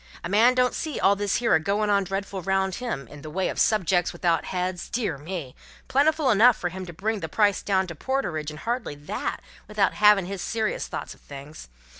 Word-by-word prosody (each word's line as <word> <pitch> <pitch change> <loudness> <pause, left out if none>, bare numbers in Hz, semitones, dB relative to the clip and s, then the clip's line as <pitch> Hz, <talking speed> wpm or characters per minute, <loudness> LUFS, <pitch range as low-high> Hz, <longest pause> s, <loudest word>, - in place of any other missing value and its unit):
A 170 - -4
man 230 +6 +5
don't 250 0 +2
see 310 -3 -3
all 200 - +4
this 200 -1 -1
here 235 -1 +2
a - - +5
goin' 205 +5 0
on 200 -1 +3
dreadful 195 0 -4
round 190 +1 0
him, 220 - -4
in 145 +3 -12
the 155 - -8
way 185 +4 -1
of - - -4
Subjects 180 -4 +2
without 170 -2 0
heads, 180 -1 -3
dear 210 - -2
me, 155 -4 -6 0.3
plentiful 295 0 +3
enough 230 +3 +6
fur 175 - -2
to 185 -1 -7
bring 210 +6 -2
the 160 - -5
price 205 +2 +2
down 190 -2 +1
to 175 - -7
porterage 160 - -2
and 155 0 -9
hardly 235 - -3
that, 145 +1 -4 0.2
without 210 -2 +1
havin' 210 -3 +5
his 195 0 -5
serious 220 +2 -2
thoughts - - -6
of - - -22
things. 140 - -11
195 Hz, 210 wpm, -25 LUFS, 170-215 Hz, 0.3 s, enough